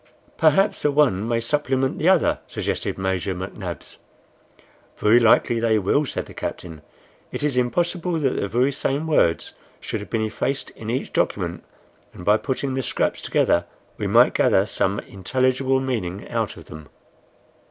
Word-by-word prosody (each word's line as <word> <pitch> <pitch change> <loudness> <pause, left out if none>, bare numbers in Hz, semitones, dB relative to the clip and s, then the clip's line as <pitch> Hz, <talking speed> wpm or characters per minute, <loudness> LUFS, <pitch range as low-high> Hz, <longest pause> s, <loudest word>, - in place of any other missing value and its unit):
"Perhaps 160 +5 +3
the 150 - +2
one 125 -9 +2
may 115 0 +1
supplement 135 +1 0
the 165 - +3
other," 190 - +3
suggested - - -3
Major 95 0 -1
McNabbs. 95 -1 -7 1.0
"Very 110 +3 +5
likely 115 0 +4
they 115 -1 +2
will," 120 +9 +1
said - - -4
the - - -13
captain. 80 -4 -6 0.5
"It - - -4
is 145 -3 0
impossible 170 +8 0
that 150 -5 +1
the - - -2
very 125 +7 +1
same 140 +2 -2
words 115 - +1 0.3
should 110 - -4
have 105 - -9
been 115 -1 0
effaced 130 +5 -3
in 110 - -9
each 125 +3 -3
document, - - -1 0.5
and 90 - -10
by 105 +1 +5
putting 135 +2 -3
the 130 - -1
scraps 125 - -1
together 85 0 +2 0.3
we - - -2
might - - +5
gather - - +3
some 95 +2 -1
intelligible 130 +6 0
meaning 105 -8 -3
out - - -2
of - - -12
them." 75 -1 -11
120 Hz, 160 wpm, -23 LUFS, 100-140 Hz, 1.0 s, Very